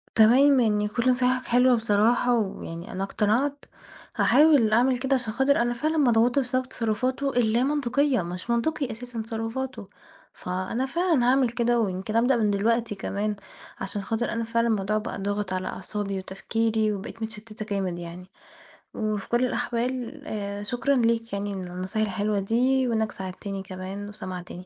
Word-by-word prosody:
تمام، 255 Hz, +5 st, +6 dB
يعني 210 Hz, -2 st, +2 dB
كُلّ 235 Hz, +4 st, +1 dB
نصايحك 255 Hz, 0 st, +1 dB
حلوة 250 Hz, +1 st, +4 dB
بصراحة، 230 Hz, +3 st, +2 dB
ويعني 175 Hz, -4 st, -5 dB
أنا 190 Hz, -, -3 dB
اقتنعت، 245 Hz, +9 st, 0 dB, 0.5 s
هاحاول 290 Hz, -8 st, +5 dB
أعمل 250 Hz, +2 st, +3 dB
كده 270 Hz, +1 st, +1 dB
عشان 245 Hz, -4 st, -1 dB
خاطر 265 Hz, +1 st, +3 dB
أنا 240 Hz, 0 st, 0 dB
فعلًا 310 Hz, +6 st, -1 dB
مضغوطة 240 Hz, 0 st, +4 dB
بسبب 255 Hz, +1 st, -2 dB
تصرفاته 255 Hz, +5 st, -1 dB
اللامنطقية، 250 Hz, +1 st, +1 dB
مش 180 Hz, +6 st, -6 dB
منطقي 260 Hz, +3 st, 0 dB
أساسًا 235 Hz, 0 st, -6 dB
تصرفاته، 225 Hz, 0 st, -5 dB, 0.5 s
فأنا 185 Hz, +8 st, -3 dB
فعلًا 330 Hz, -4 st, +1 dB
هاعمل 255 Hz, 0 st, +4 dB
كده 235 Hz, 0 st, +1 dB
ويمكن 195 Hz, +1 st, -2 dB
أبدأ 245 Hz, +2 st, +4 dB
من 215 Hz, -2 st, +2 dB
دلوقتي 225 Hz, +2 st, +1 dB
كمان، 205 Hz, +1 st, -2 dB, 0.4 s
عشان 200 Hz, +1 st, -3 dB
خاطر 225 Hz, +3 st, -2 dB
أنا 230 Hz, 0 st, -1 dB
فعلًا 230 Hz, +1 st, +1 dB
الموضوع 215 Hz, 0 st, +1 dB
بقى 215 Hz, -, -5 dB
ضاغط 205 Hz, -1 st, -2 dB
على 185 Hz, 0 st, -2 dB
أعصابي 200 Hz, 0 st, -4 dB
وتفكيري 220 Hz, +3 st, -1 dB
وبقيت 210 Hz, +3 st, -7 dB
متشتّتة 220 Hz, -1 st, -6 dB
جامد 185 Hz, -3 st, -2 dB
يعني، 175 Hz, +1 st, -8 dB, 0.7 s
وفي 215 Hz, -2 st, -3 dB
كُلّ 240 Hz, +2 st, +2 dB
الأحوال 250 Hz, +4 st, -2 dB
آآ، 205 Hz, -3 st, -4 dB
شكرًا 250 Hz, +5 st, +1 dB
ليك 230 Hz, -2 st, +1 dB
يعني 200 Hz, 0 st, -2 dB
على 185 Hz, -2 st, -5 dB
النصايح 190 Hz, +4 st, -1 dB
الحلوة 205 Hz, +2 st, -1 dB
دي 250 Hz, +6 st, +2 dB
وإنّك 220 Hz, -2 st, 0 dB
ساعدتني 190 Hz, +1 st, -6 dB
كمان 190 Hz, +2 st, -7 dB
وسمعتني. 185 Hz, -3 st, -7 dB
225 Hz, 150 wpm, -26 LUFS, 205-250 Hz, 0.7 s, تمام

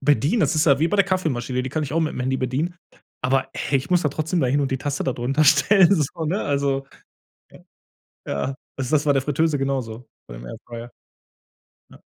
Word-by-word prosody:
bedienen”, 145 Hz, +9 st, +2 dB
das -, -, +2 dB
ist 155 Hz, +1 st, +2 dB
ja 140 Hz, -3 st, +5 dB
wie 165 Hz, +2 st, +2 dB
bei 205 Hz, -, 0 dB
der 200 Hz, -, +5 dB
Kaffeemaschine, 130 Hz, -9 st, -1 dB
die 130 Hz, -, -4 dB
kann 155 Hz, -, -2 dB
ich 145 Hz, -, -4 dB
auch 165 Hz, -, +1 dB
mit'm 155 Hz, -5 st, -2 dB
Handy 130 Hz, +1 st, 0 dB
bedienen, 135 Hz, +8 st, -2 dB, 0.5 s
aber, 130 Hz, +1 st, +1 dB
hey, 140 Hz, -, 0 dB
ich 140 Hz, +6 st, -8 dB
muss 180 Hz, -1 st, +3 dB
da 150 Hz, -, +2 dB
trotzdem 155 Hz, +5 st, -1 dB
da 130 Hz, -, +2 dB
hin 140 Hz, +3 st, +2 dB
und 135 Hz, -, -1 dB
die 130 Hz, -, -1 dB
Tasse 145 Hz, +1 st, -3 dB
da 130 Hz, -, 0 dB
drunter 135 Hz, +6 st, 0 dB
stellen, 195 Hz, +5 st, +5 dB
so, 160 Hz, 0 st, -2 dB
ne? 185 Hz, +7 st, -1 dB
Also 140 Hz, -1 st, 0 dB, 1.4 s
ja? 70 Hz, -, -2 dB
Ja, 135 Hz, -, -6 dB, 0.2 s
also 130 Hz, -2 st, -3 dB
das -, -, -2 dB
ist -, -, -9 dB
bei 145 Hz, -, +4 dB
der 135 Hz, -, +2 dB
Fritteuse 150 Hz, +2 st, +1 dB
genauso, 130 Hz, -4 st, -3 dB, 0.2 s
beim -, -, -9 dB
Airfryer, 120 Hz, -, -9 dB, 1.0 s
ne? -, -, -17 dB
140 Hz, 215 wpm, -22 LUFS, 130-160 Hz, 1.4 s, ja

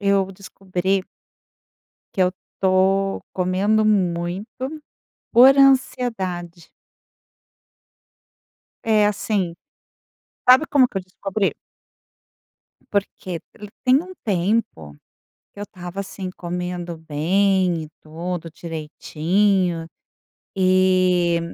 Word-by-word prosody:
eu 195 Hz, -1 st, +1 dB
descobri 190 Hz, 0 st, -2 dB, 1.1 s
que 190 Hz, -, 0 dB
eu 180 Hz, 0 st, +3 dB, 0.3 s
tô 195 Hz, +1 st, +2 dB
comendo 195 Hz, +4 st, +1 dB
muito, 180 Hz, -2 st, 0 dB, 0.9 s
por 260 Hz, +3 st, +7 dB
ansiedade. 210 Hz, -, +1 dB, 2.1 s
É, 215 Hz, -2 st, +3 dB
assim 200 Hz, -4 st, -1 dB, 1.0 s
Sabe 260 Hz, +5 st, +7 dB
como 260 Hz, -3 st, +4 dB
que 195 Hz, -, -3 dB
eu -, -, -7 dB
descobri? 195 Hz, +2 st, -2 dB, 1.4 s
Porque 190 Hz, -3 st, -3 dB
ele 210 Hz, -1 st, -11 dB
tem 260 Hz, +3 st, +4 dB
um 370 Hz, +1 st, -10 dB
tempo 185 Hz, -, -1 dB, 0.6 s
que 205 Hz, -, -12 dB
eu -, -, -3 dB
estava 180 Hz, -1 st, -7 dB
assim 190 Hz, -1 st, -6 dB
comendo 175 Hz, -1 st, -4 dB
bem 175 Hz, +3 st, +1 dB
e -, -, -11 dB
tudo 165 Hz, +2 st, -5 dB
direitinho 170 Hz, +3 st, -1 dB, 0.7 s
e 185 Hz, -2 st, +3 dB
185 Hz, 85 wpm, -22 LUFS, 175-205 Hz, 2.1 s, por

